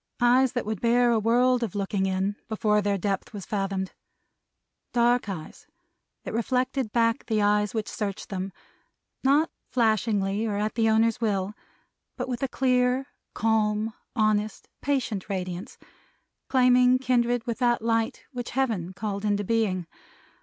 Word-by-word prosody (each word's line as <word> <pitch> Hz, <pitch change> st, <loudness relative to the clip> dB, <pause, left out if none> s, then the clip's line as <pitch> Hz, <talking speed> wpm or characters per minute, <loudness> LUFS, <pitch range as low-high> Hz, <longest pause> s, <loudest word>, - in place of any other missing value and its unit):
Eyes 250 Hz, +1 st, +4 dB
that 245 Hz, -, -2 dB
would 215 Hz, -2 st, -3 dB
bear 240 Hz, +1 st, +4 dB
a 230 Hz, -, +3 dB
world 245 Hz, +3 st, +3 dB
of 225 Hz, -5 st, -3 dB
looking 195 Hz, -1 st, 0 dB
in, 190 Hz, +2 st, 0 dB
before 210 Hz, -1 st, +2 dB
their 200 Hz, 0 st, 0 dB
depth 195 Hz, +2 st, -2 dB
was 200 Hz, -3 st, -6 dB
fathomed. 195 Hz, -2 st, -2 dB, 1.0 s
Dark 240 Hz, -1 st, +3 dB
eyes, 175 Hz, -, -7 dB, 0.6 s
that -, -, -6 dB
reflected 250 Hz, +1 st, 0 dB
back 230 Hz, +2 st, +1 dB
the 220 Hz, -2 st, +1 dB
eyes 210 Hz, +1 st, +2 dB
which 220 Hz, -1 st, -1 dB
searched 200 Hz, -3 st, -4 dB
them; 195 Hz, 0 st, -4 dB, 0.7 s
not 290 Hz, +5 st, +3 dB, 0.2 s
flashingly 215 Hz, -3 st, +1 dB
or 205 Hz, -2 st, -1 dB
at 210 Hz, +1 st, -1 dB
the 225 Hz, -1 st, +2 dB
owner's 225 Hz, +2 st, +2 dB
will, 200 Hz, -3 st, 0 dB, 0.6 s
but -, -, -3 dB
with 245 Hz, -2 st, -3 dB
a 270 Hz, -, +1 dB
clear, 255 Hz, 0 st, +1 dB, 0.3 s
calm, 220 Hz, 0 st, +1 dB, 0.2 s
honest, 215 Hz, -1 st, 0 dB
patient 255 Hz, -9 st, -1 dB
radiance, 185 Hz, +2 st, -4 dB, 0.7 s
claiming 250 Hz, -1 st, +5 dB
kindred 245 Hz, -2 st, +1 dB
with 235 Hz, 0 st, -3 dB
that 240 Hz, -2 st, +2 dB
light 230 Hz, +2 st, 0 dB
which 245 Hz, -3 st, -5 dB
Heaven 220 Hz, -9 st, -1 dB
called 200 Hz, 0 st, -4 dB
into 205 Hz, -1 st, +1 dB
being. 200 Hz, -4 st, 0 dB
220 Hz, 145 wpm, -26 LUFS, 205-245 Hz, 1.0 s, claiming